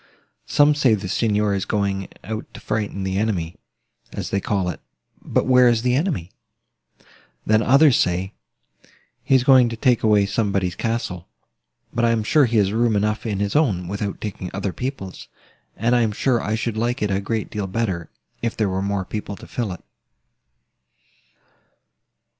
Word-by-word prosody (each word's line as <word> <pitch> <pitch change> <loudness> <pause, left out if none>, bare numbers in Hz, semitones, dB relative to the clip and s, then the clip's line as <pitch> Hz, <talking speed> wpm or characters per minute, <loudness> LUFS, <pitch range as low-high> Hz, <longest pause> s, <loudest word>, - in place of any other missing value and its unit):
Some 145 +1 +4
say 135 -6 +3
the 100 -2 -5
Signor 105 +1 +1
is 95 -1 -1
going 100 -2 -1 0.2
out 110 +3 -6
to - - -8
frighten 105 -3 -3
the 95 0 -1
enemy, 90 -6 -2 0.5
as - - -5
they 100 - 0
call 95 -2 -1
it: 90 - -5 0.4
but - - 0
where 125 -1 +6
is 115 -1 +1
the 125 0 +2
enemy? 135 - -1 1.1
Then 110 0 +3
others 140 +2 +5
say, 90 +2 0 0.9
he 135 - +3
is 130 - +4
going 130 -2 +6
to 115 - -4
take 125 -1 +2
away 105 -2 +4
somebody's 100 -3 0
castle: 115 -5 -3 0.7
but 120 -1 0
I 115 - +4
am 115 -2 +1
sure 145 +6 +4
he 115 -1 0
has 100 -1 +2
room 115 -1 +2
enough 105 +2 0
in 100 -3 -2
his 100 +3 -1
own, 105 - +2
without 100 +1 -4
taking 95 -3 -5
other 100 -1 -2
people's; 125 -8 -6 0.5
and 120 +3 +2
I 120 - +3
am 110 -2 +1
sure 120 +2 +1
I 105 - -1
should 115 -1 -3
like 120 0 -1
it 105 - 0
a 95 0 0
great 110 +2 -3
deal 105 -2 -3
better, 95 -5 -2 0.3
if 115 -1 -2
there 105 -3 +1
were 95 0 -1
more 100 -1 -1
people 105 0 -5
to - - -12
fill 115 -5 -3
it." 90 - -8
105 Hz, 175 wpm, -22 LUFS, 100-120 Hz, 1.1 s, where